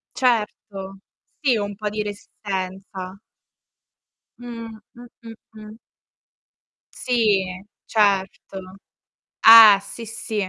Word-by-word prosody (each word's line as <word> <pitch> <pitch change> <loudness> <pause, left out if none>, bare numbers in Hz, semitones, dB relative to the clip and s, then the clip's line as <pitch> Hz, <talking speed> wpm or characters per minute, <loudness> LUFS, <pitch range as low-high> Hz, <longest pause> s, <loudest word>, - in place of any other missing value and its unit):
Certo, 210 -5 -2 0.4
sì 270 -5 +1
un 205 0 -4
po' 210 +1 -4
di 210 0 -4
resistenza. 195 -2 -7 1.2
Mh. 235 -2 -9 0.3
Mh, 245 +1 -13 0.2
mh, 230 -1 -11 0.2
mh. 215 0 -12 1.2
Sì, 220 -6 +1 0.4
certo. 195 -2 -1 0.8
Eh, 225 -3 +9
sì, 230 +2 -10
sì, 215 -3 -5
210 Hz, 85 wpm, -21 LUFS, 195-230 Hz, 1.2 s, Eh